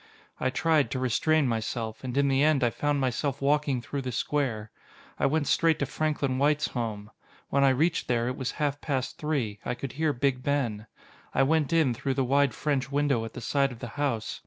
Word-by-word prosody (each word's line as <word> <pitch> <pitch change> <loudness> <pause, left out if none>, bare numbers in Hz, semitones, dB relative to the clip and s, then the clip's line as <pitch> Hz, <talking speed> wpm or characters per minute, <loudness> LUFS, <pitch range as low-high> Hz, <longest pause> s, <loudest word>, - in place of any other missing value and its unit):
I 130 - +1
tried 155 +2 +2
to 130 - -3
restrain 140 +4 +2
myself, 115 0 -3
and 130 0 -4
in 140 0 +3
the 135 0 +2
end 150 -3 +3
I 120 - +3
found 145 +2 0
myself 135 +1 -1
walking 140 -3 +1
through 140 +3 -4
the 130 -1 -4
square. 120 -4 -1 0.5
I - - +3
went 150 +1 +1
straight 165 +2 +3
to 140 - 0
Franklin 145 -2 -1
White's 150 +2 +2
home. 110 -3 -4 0.4
When 140 - +2
I 135 - +6
reached 155 +6 +1
there, 120 -1 +1
it 125 - -2
was 130 -2 -3
half 145 -2 -1
past 135 -4 -2
three 130 -10 -2
I - - -2
could 135 0 -6
hear 155 +2 0
Big 130 -1 0
Ben. 120 -6 -1 0.5
I - - +4
went 150 0 +2
in 160 -7 +3
through 130 +3 -2
the 135 -1 +1
wide 140 -2 +2
French 135 0 -1
window 140 -5 +1
at 115 - -8
the - - -7
side 140 +3 +1
of 120 - -9
the 120 0 -7
house. 130 -4 -2
135 Hz, 210 wpm, -27 LUFS, 125-145 Hz, 0.5 s, I